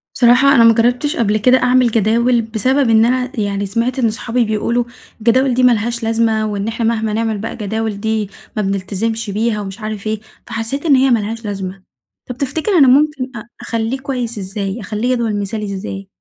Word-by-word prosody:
بصراحة، 260 +3 +5
أنا 235 - +6
ما 230 0 +7
جرّبتش 245 +6 +1
قبْل 215 -2 +1
كده 250 +4 +4
أعمِل 250 -1 +3
جداول، 230 +3 +2
بسبب 235 +4 0
إن 225 0 +5
أنا 255 +1 0
يعني 200 -1 -1
سمعْت 235 +6 -1
إن 230 - +2
صحابي 230 +2 -1
بيقولوا 225 +3 0 0.4
الجداول 250 +4 +2
دي 255 +1 +1
ما 250 - +6
لهاش 235 +1 -1
لازمة، 225 -1 +1
وإن 205 0 -3
إحنا 230 +1 -2
مهْما 220 -1 0
نعمل 225 -1 -1
بقى 225 +3 -5
جداول 215 0 -3
دي، 220 -1 -1 0.3
ما 215 - 0
بنلتزمْش 205 +3 -2
بيها، 215 +1 -1
ومش 195 +1 -7
عارف 215 -1 -5
إيه، 215 0 -1 0.3
فحسّيت 225 +6 -4
إن 295 -4 +5
هي 265 +1 +3
ما 235 -3 +3
لهاش 225 +2 -5
لازمة. 195 -2 -5 0.5
طَب 250 - -5
تفتكر 290 +8 -2
أنا 305 -9 +6
ممكن 275 -1 +2
أ 215 - -12
أخلّيه 230 +3 -2
كويّس 250 -5 -4
إزّاي، 195 +2 -4
أخليه 215 +5 -1
جدول 225 -4 -1
مثالي 205 0 -4
إزّاي؟ 195 0 -6
225 Hz, 195 wpm, -17 LUFS, 210-250 Hz, 0.5 s, ما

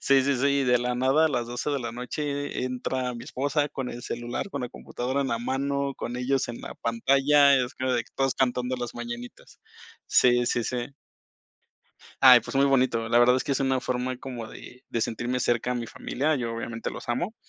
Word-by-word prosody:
sí, 135 -1 +4
sí, 140 0 +1
sí, 130 +3 +1
y 140 0 +2
de 125 0 +4
la 125 +1 -1
nada 135 +5 +3
a - - +1
las 125 -5 -1
12 120 +4 -3
de 140 -2 -1
la 120 -1 -4
noche 125 +5 -5
e 145 0 -3
e - - -1
entra 125 0 -2
mi 120 - -8
esposa 145 +2 -1
con 130 -3 -5
el 120 - -8
celular, 120 +10 -4
con - - -4
la 125 - -3
computadora 130 +3 -3
en 135 - -2
la 115 -2 -1
mano, 140 +3 -1
con 120 - -5
ellos 130 +2 0
en 120 - -6
la - - -8
pantalla. 140 +4 +4
Es 125 -1 -1
como 130 0 -1
de 120 -2 0
que - - -24
todos 135 -1 +1
cantando 125 -1 0
las 120 -1 -5
mañanitas 120 0 -8 0.5
sí, 120 -1 +4
sí, 120 - +1
sí. 120 0 -2 1.4
Ay, 130 -2 +11
pues 120 - -8
muy 135 +1 +4
bonito. 125 -4 +2
La 120 0 +4
verdad 120 +1 +6
es 130 - +1
que - - -5
es 140 - +1
una 135 -1 +1
forma 125 0 -2
como 125 -3 -7
de 125 +3 -12
de 115 - -2
sentirme 120 +3 -2
cerca 120 +1 +1
de 120 - -2
mi 115 - -6
familia. 150 +4 -1
Yo, 115 -3 -3
obviamente, 115 0 -4
los - - -9
amo, 175 - -1
125 Hz, 225 wpm, -26 LUFS, 120-135 Hz, 1.4 s, Ay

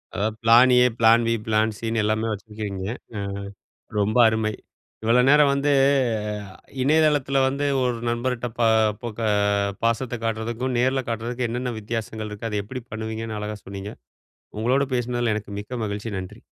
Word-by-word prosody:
அதாவது 105 +2 -1
plan 120 +3 +7
A, - - +6
plan 115 +1 +6
B, 115 - +2
plan 110 0 +2
சின்னு 115 -1 -1
எல்லாமே 110 +1 0
வச்சிருக்கிறீங்க. 105 -2 -5 0.3
அ - - -2 0.8
ரொம்ப 105 +3 +1
அருமை! 110 -1 0 0.5
இவ்வளோ 115 +3 +4
நேரம் 145 0 +6
வந்து, 140 +1 +1 0.8
அ - - -12 0.3
இணையதளத்தில 145 -1 +3
வந்து, 140 +2 -1 0.2
ஒரு 125 -1 0
நண்பர்ட்ட 120 +1 -1
பா 120 - +3 0.4
பொக 115 -2 -6 0.6
பாசத்த 115 +1 0
காட்டுறதுக்கும், 115 +3 -2
நேரில 130 +2 +2
காட்டுறதுக்கும், 120 +2 -2
என்னென்ன 125 +1 -2
வித்தியாசங்கள் 110 0 -4
இருக்கு? 105 +2 -5
அதை 105 - -1
எப்புடி 125 +4 -7
பண்ணுவீங்கன்னு, 110 0 -4
அழகா 105 0 -4
சொன்னீங்க. 100 +1 -7 0.7
உங்களோடு 130 +5 +2
பேசுனதுல 120 -2 0
எனக்கு 105 -1 -7
மிக்க 120 +4 -6
மகிழ்ச்சி. 105 +2 -4
நன்றி. 95 +5 -8
115 Hz, 145 wpm, -24 LUFS, 110-125 Hz, 0.8 s, plan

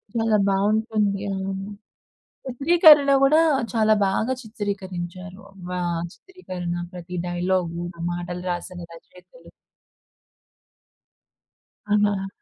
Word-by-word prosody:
చాలా 225 -2 +2
బాగుంటుంది. 210 +1 +1
అవును. 195 0 -4 0.8
చిత్రీకరణ 290 +2 +6
కూడా 300 +4 +5 0.3
చాలా 220 -1 +3
బాగా 220 +6 0
చిత్రీకరించారు. 190 -4 -6 0.3
వా 180 0 -3 0.3
చిత్రీకరణ 185 - -7 0.2
ప్రతి 180 0 -7
డైలాగు, 175 -1 -1
ఇంక 175 -1 -11
మాటలు 175 0 -5
రాసిన 175 +1 -6
రచయితలు. 180 - -17 2.4
అవునా! 205 -2 +1
195 Hz, 80 wpm, -23 LUFS, 180-225 Hz, 2.4 s, చిత్రీకరణ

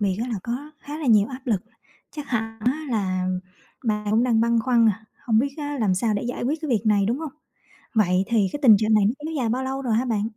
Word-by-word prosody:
biệt 195 -3 0
á 250 - -3
là 235 - -2
có 260 +6 -5
khá 295 +2 -7
là 305 - -4
nhiều 215 -2 +5
áp 260 -1 -7
lực. 205 -6 0 0.5
Chắc 295 -2 -7
hẳn 225 -2 -2
á 285 +6 0
là 185 -5 -1 0.6
bạn 210 -2 -1
cũng 225 +3 +3
đang 230 -3 +2
băn 235 0 +2
khoăn, 240 -2 +3
à, 220 +1 -2 0.2
không 220 -3 +2
biết 275 +3 0
á 290 -1 -4
làm 200 -4 +2
sao 215 +3 0
để 205 - -2
giải 245 0 -4
quyết 290 +6 -1
cái 310 - -3
việc 220 -5 +1
này, 205 -2 +3
đúng 240 +4 0
hông? 315 -3 -6 0.6
Vậy 190 -3 +3
thì 215 -5 +2
cái 290 - -4
tình 225 -6 +8
trạng 215 +1 +2
này 210 -2 +4
nó 215 - +2
kéo 320 - -4
dài 250 -5 0
bao 255 +4 -1
lâu 270 +1 -3
rồi 240 -4 0
hả 235 +3 +2
bạn? 225 -5 0
230 Hz, 265 wpm, -24 LUFS, 215-260 Hz, 0.6 s, tình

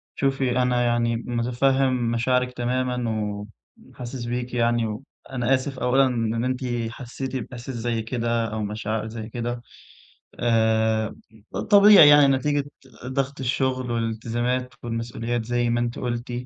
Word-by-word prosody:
شوفي 135 -2 +1
أنا 125 -1 +2
يعني 120 -1 +1
متفهم 125 +1 +1
مشاعرِك 125 +2 +1
تمامًا 125 -1 -1 0.8
وحاسس 125 0 -7
بيكِ 120 +1 -3
يعني، 120 -1 +2
وأنا 125 +3 -3
آسف 130 0 -2
أولًا 130 +2 +3
إن 115 -2 -1
أنتِ 130 0 -1 0.3
حسّيتِ 130 +2 -6
بإحساس 125 +1 -6
زي 115 -1 -2
كده 115 0 -1
أو 110 0 -2
مشاعر 110 +1 -3
زي 110 0 -7
كده، 120 +1 -4 0.8
آآ 110 -1 +2 0.6
طبيعي 205 -5 +9
يعني 145 -1 +8
نتيجة 140 +2 +1 0.4
ضغط 135 +1 -2
الشغل 130 -1 -1
والالتزامات 120 +2 -2
والمسؤوليات 115 0 -3
زي 120 0 0
ما 120 - +1
أنتِ 120 0 -2
قُلتِ، 120 0 -3
120 Hz, 125 wpm, -24 LUFS, 115-130 Hz, 0.8 s, طبيعي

